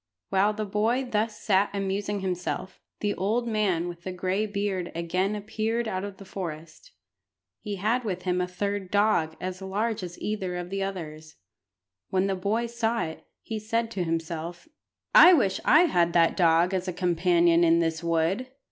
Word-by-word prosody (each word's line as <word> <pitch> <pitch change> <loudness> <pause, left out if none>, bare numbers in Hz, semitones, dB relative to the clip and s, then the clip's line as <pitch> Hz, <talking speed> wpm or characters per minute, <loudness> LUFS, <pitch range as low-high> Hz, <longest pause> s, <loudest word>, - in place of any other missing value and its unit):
While 195 +2 +3
the 215 0 -3
boy 220 +6 0
thus 220 -2 -1
sat 200 0 +2
amusing 200 +1 -2
himself, 185 0 -3 0.2
the 205 -1 0
old 220 +6 -1
man 200 -6 0
with 175 -1 -7
the 185 - -5
gray 185 +3 -1
beard 200 -3 -2
again 185 +4 -1
appeared 220 +2 -2
out 185 -3 -2
of 200 -1 -6
the 195 - -12
forest. 170 - -8 0.7
He 210 -2 -5
had 220 +6 0
with 185 -5 -3
him 180 0 0
a 180 - -1
third 200 +1 -3
dog 200 -6 +2
as 185 +1 -5
large 205 +3 -2
as 175 -1 -7
either 190 -4 -3
of 180 0 -5
the 195 0 -2
others. 160 -5 -6 0.7
When 190 0 +1
the 195 - 0
boy 205 +5 0
saw 235 0 -1
it, 160 0 -7 0.2
he 220 -1 -4
said 225 +2 -1
to 190 -5 -2
himself 165 - -4 0.5
"I 370 -8 +10
wish 205 - +2
I 305 - +7
had 175 - +2
that 165 -1 +4
dog 170 +1 +3
as 185 0 -1
a 180 - -2
companion 175 -1 +3
in 165 0 +5
this 165 0 0
wood. 170 +8 0
190 Hz, 175 wpm, -27 LUFS, 175-210 Hz, 0.7 s, I